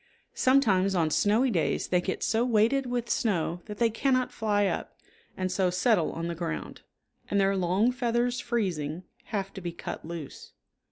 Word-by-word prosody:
Sometimes 200 -8 +3
on 160 -3 +1
snowy 225 +9 +3
days 170 -6 0
they 180 -1 +3
get 190 - -3
so 225 +1 +2
weighted 245 +3 +2
with 245 -1 -2
snow 175 -5 0
that 210 -2 -7
they 230 0 +2
cannot 255 +2 +1
fly 205 -2 +1
up, - - -3 0.4
and 185 -1 -1
so 185 0 +2
settle 180 0 +2
on 165 - -4
the 170 - -2
ground, 165 -1 -5 0.5
and 200 - +2
their 195 0 +3
long 190 +6 +2
feathers 245 0 0
freezing, 180 - -2 0.2
have 195 -2 -3
to 195 - -8
be 175 -1 -4
cut 170 - -7
loose. 165 -3 -8
200 Hz, 170 wpm, -28 LUFS, 175-235 Hz, 0.5 s, Sometimes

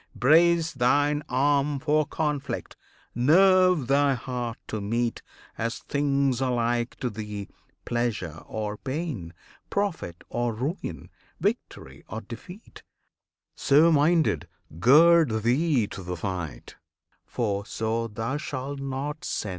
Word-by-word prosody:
brace 165 +4 +4
Thine 145 +4 +2
arm 140 +2 +2
for 150 +2 +1
conflict, 150 -3 -3 0.4
nerve 180 +4 +5
thy 140 +1 +3
heart 120 -1 -4
to 110 - -4
meet 115 +3 -1 0.4
As 115 +1 -2
things 140 -3 0
alike 120 -2 0
to 125 - 0
thee 105 -1 -6 0.4
pleasure 110 -9 -2
or 105 -1 -4
pain, 130 - -4 0.4
Profit 180 - -2
or 120 -2 -2
ruin, 140 - -5 0.3
victory - - -3
or 110 +3 -5
defeat: 150 - -11 0.7
So 155 +4 +5
minded, 160 +2 +2 0.3
gird 150 - +5
thee 130 0 +2
to - - -7
the 90 0 -5
fight, 90 -4 -5 0.5
for 100 -4 -2
so 115 +1 -2
Thou 115 +5 -3
shalt 140 -2 -5
not 140 +3 -4
sin! 105 - -3
130 Hz, 115 wpm, -26 LUFS, 115-150 Hz, 0.7 s, nerve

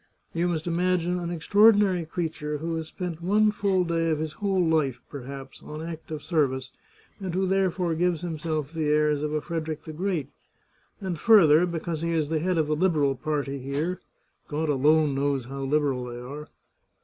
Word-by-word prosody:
You 170 +1 +1
must 160 -3 -2
imagine 180 0 +1
an 170 -1 -3
extraordinary 200 +1 +4
creature 155 -3 -3
who 165 +3 -3
has 160 -1 -4
spent 175 0 -5
one 210 +4 +3
full 195 -3 +1
day 165 -1 0
of 155 - +1
his 155 0 -3
whole 195 -3 +1
life, 150 -6 +1
perhaps, 135 -1 -8
on 150 - -8
active 160 -2 -6
service, 135 -6 0 0.5
and 185 -3 -4
who 190 +1 +1
therefore 185 -2 +1
gives 170 0 +1
himself 155 -3 -3
the 160 -2 -1
airs 150 -1 +2
of 150 0 -2
a 155 0 -1
Frederick 160 -1 -4
the 155 - -8
Great; 175 -3 -2 0.7
and, 185 -5 -4
further, 180 -7 +6
because 165 -2 -3
he 170 0 -1
is 155 -3 0
the 160 -1 +1
head 180 +2 0
of 160 - +3
the 155 +1 0
Liberal 150 -5 +2
party 140 +1 -2
here 150 +8 -2 0.5
(God 155 +1 -2
alone 150 +1 +3
knows 135 -2 0
how 135 +2 -6
liberal 135 -3 +1
they 120 -1 -7
are 145 +5 -8
160 Hz, 180 wpm, -26 LUFS, 150-175 Hz, 0.7 s, further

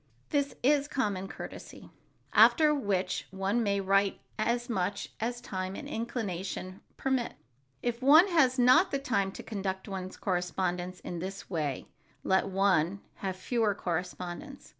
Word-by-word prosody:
This 285 -1 0
is 285 +1 +4
common 205 -10 -1
courtesy. - - -9 0.4
After 305 -2 +6
which 195 -9 -1
one 195 +5 0
may 200 -2 +1
write 195 0 +2 0.2
as 240 +2 0
much 195 -5 -2
as 240 +2 -2
time 190 -5 -4
and - - -7
inclination 195 -5 -4 0.2
permit. 265 -3 -1 0.5
If 240 0 -1
one 305 +8 +8
has 275 -7 +4
not 255 +9 +6
the 275 - 0
time 200 -8 0
to - - -8
conduct 190 -2 -4
one's 190 -2 -5
correspondence 180 0 -2
in 175 - -5
this 195 +2 -6
way, 150 -6 -2 0.4
let 190 +1 +2
one 195 -1 +2 0.2
have 190 -2 -3
fewer 215 +2 0
correspondents. 180 - -5
200 Hz, 140 wpm, -30 LUFS, 185-245 Hz, 0.5 s, one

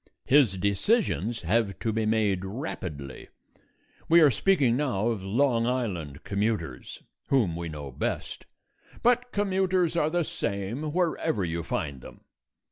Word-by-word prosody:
His 130 -9 +4
decisions 100 - +1
have 100 +3 0
to 110 -2 -2
be 110 0 0
made 105 -4 +1
rapidly. 90 - -6 0.8
We 170 +1 +7
are 150 -3 +7
speaking 140 -6 +3
now 125 -6 0
of 110 -4 -2
Long 115 +4 +1
Island 90 - -3
commuters, 100 - -3 0.2
whom 110 -12 +2
we 85 0 -4
know 75 -3 -7
best; - - -4 0.6
but 245 +1 +3
commuters 190 -4 +1
are 155 -2 +2
the 175 +1 +1
same 115 +5 -3
wherever 160 - 0
you 85 0 -2
find 70 -5 -3
them. - - -13
110 Hz, 130 wpm, -27 LUFS, 95-150 Hz, 0.8 s, We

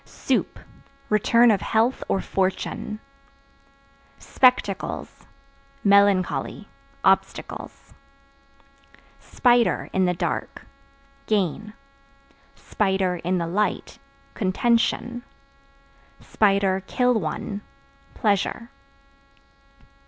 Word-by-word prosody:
Soup - - -2 0.5
Return 230 +3 +4
of 200 -4 +1
health 230 +6 +1
or 195 - 0
fortune. 190 +2 -2 1.2
Spectacles 250 -7 0 0.6
Melancholy, 200 -2 +2 0.4
obstacles. - - -1 1.3
Spider 240 -2 +1
(In 190 0 +2
the 180 0 0
dark) - - -4 0.6
gain; 210 +1 -1 1.1
(in 185 -3 +1
the 170 - -1
light) 205 +5 -2 0.3
contention; 235 +4 0 1.3
(kill 195 +5 +1
one) 200 +1 -3 0.5
pleasure. 215 +2 -1
200 Hz, 65 wpm, -23 LUFS, 190-230 Hz, 1.3 s, Return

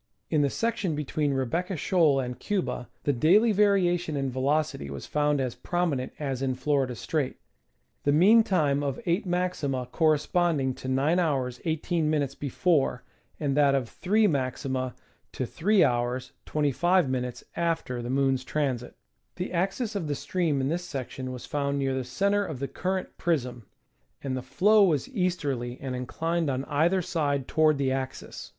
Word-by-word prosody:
In 155 -2 +3
the 140 - +2
section 205 - -1
between 150 0 -1
Rebecca 150 +8 -1
Shoal 155 -4 +3
and 125 -1 -4
Cuba 190 -10 -2
the 145 - +2
daily 190 - +4
vari 200 -3 +4
ation 175 -3 -1
in 135 -1 -1
velocity 135 - 0
was 70 -2 -6
found 150 -1 +1
as 130 -3 -1
prominent 165 -7 -1
as 135 -3 -3
in 130 -1 0
Florida 130 -1 0
Strait, 140 +2 -2 0.7
the 145 - +3
mean 195 +10 +6
time 150 -9 +1
of 140 -2 -2
eight 180 +4 0
maxima 175 -8 -1
corresponding 155 -3 +2
to 130 - -9
G*" 130 - +1
18™ 150 0 0
before, 145 -2 +1 0.4
and 140 -3 0
that 140 -2 +4
of 130 -4 0
three 210 - +1
maxima 130 -4 -1 0.4
to - - -2
3^ 125 - +1 0.2
25™ 140 -5 +1
after 165 -7 -1
the 120 - -5
moon's 135 -1 +1
transit. 130 -5 -2 0.4
The 180 0 -4
axis 195 +6 -1
of 180 -6 -2
the 145 - -1
stream 160 -2 0
in 130 - 0
this 175 +3 -1
section 130 -4 -5
was 125 -1 -7
found 140 -1 -1
near 135 -1 0
the 130 0 -1
center 200 +11 +1
of 155 -8 -5
the 140 +2 -3
current 185 +6 -3
prism, 125 - -1 0.6
and 135 -2 -2
the 130 - -3
flow 200 - +4
was 165 - +2
easterly 145 - -1
and 130 -2 -4
inclined 165 +6 -1
on 135 0 -2
either 170 +5 +2
side 145 -6 -1
toward 155 -2 +3
the 135 -1 0
axis. 130 0 -5
145 Hz, 155 wpm, -27 LUFS, 130-175 Hz, 0.7 s, mean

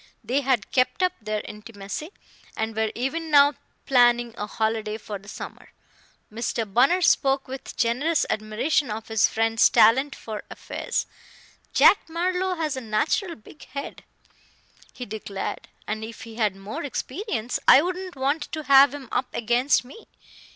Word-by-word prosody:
They 270 +4 0
had 260 -6 0
kept 255 +8 +1
up 365 0 +2
their 215 0 -2
intimacy, 210 - -8 0.5
and 220 0 -2
were 220 0 0
even 315 +7 -3
now 285 -1 +6 0.3
planning 240 -2 +4
a 210 - -4
holiday 220 0 -2
for 210 -2 -7
the 200 - -18
summer. - - -9 0.6
Mr. 230 0 -2
Bunner 260 - +3
spoke 270 -4 +3
with 265 +1 -8
generous 255 +7 +1
admiration 225 +7 0
of 220 +1 -6
his 220 -2 +3
friend's 225 0 +3
talent 265 +6 +4
for 215 -2 -7
affairs. - - -3 0.7
"Jack 400 - +5
Marlowe 365 +2 -1
has 310 -4 -2
a 260 - -5
natural 280 - -1
big 225 +7 -16
head," 280 +2 -7 0.9
he 250 - -8
declared, 205 -2 -5 0.2
"and 215 +1 -4
if 225 0 -8
he 225 0 -10
had 215 -4 0
more 205 +12 -6
experience, 265 - -3
I 280 - +8
wouldn't 365 0 -4
want 275 +4 -1
to 310 -1 -3
have 275 0 +6
him 275 -3 -9
up 250 +1 0
against 245 +3 +2
me. 280 - -14
245 Hz, 150 wpm, -24 LUFS, 220-290 Hz, 0.9 s, I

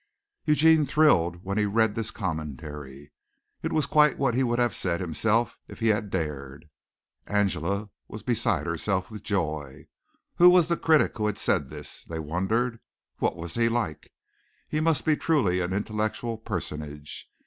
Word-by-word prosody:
Eugene 155 0 +5
thrilled 95 - +3
when 100 +2 -1
he 105 - +2
read 110 +1 +2
this 115 0 -2
commentary. 75 - -6 0.5
It - - -2
was 155 -2 +1
quite 150 -2 +4
what 135 -3 +1
he 130 - +1
would 120 -2 +1
have 120 -3 +2
said 85 -4 -1
himself 105 +7 0
if - - -11
he 115 -1 +2
had 105 -1 +1
dared. 75 -4 -4 0.6
Angela 100 0 0 0.2
was - - -9
beside - - +1
herself 95 0 -1
with 105 -2 -8
joy. 75 -9 -3 0.5
Who 175 +1 +9
was 180 -2 +5
the 170 - +3
critic 160 -2 +3
who 105 - +1
had 105 - -2
said - - 0
this, - - -9
they 80 - -6
wondered? 95 +10 -1 0.4
What - - +1
was 85 0 -6
he 115 0 +2
like? 115 -10 -3 0.6
He 155 - -1
must 155 -3 +1
be 155 - +4
truly 130 - +1
an 90 0 -2
intellectual 110 +3 -2
personage. 75 -8 -6
105 Hz, 160 wpm, -26 LUFS, 80-120 Hz, 0.6 s, Who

